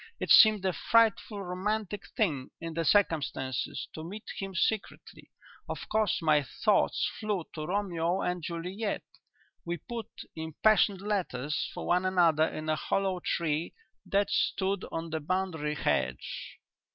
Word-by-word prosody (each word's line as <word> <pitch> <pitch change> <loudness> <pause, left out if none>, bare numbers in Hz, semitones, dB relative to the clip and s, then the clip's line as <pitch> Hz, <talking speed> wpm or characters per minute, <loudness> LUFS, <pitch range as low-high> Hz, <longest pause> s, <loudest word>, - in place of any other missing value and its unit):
It - - -2
seemed 215 -4 +8
a 185 - +2
frightfully 220 -2 +2
romantic 200 +2 -3
thing 150 - 0
in 165 0 -5
the 165 +1 -1
circumstances 145 - +1
to 155 - -7
meet 205 +6 -7 0.2
him 195 -1 -5
secretly 215 +4 -2 0.4
of - - -5
course 215 -5 +1
my 155 -2 +4
thoughts 200 - +1
flew 210 -6 -2
to 155 -1 -5
Romeo 180 -2 0
and 180 0 -1
Juliet. 180 +6 -3 0.6
We 175 0 -3
put 230 +6 -6 0.3
impassioned 190 +5 +2
letters 170 -9 -2
for - - -5
one 180 +1 +2
another 165 -4 +4
in 155 -1 -6
a 155 - +2
hollow 190 +3 0
tree 165 -1 -1 0.3
that 200 +1 +1
stood 195 0 0
on 165 0 -4
the 160 - -1
boundary 160 -2 -1
hedge. 65 - -2
180 Hz, 140 wpm, -30 LUFS, 160-200 Hz, 0.6 s, seemed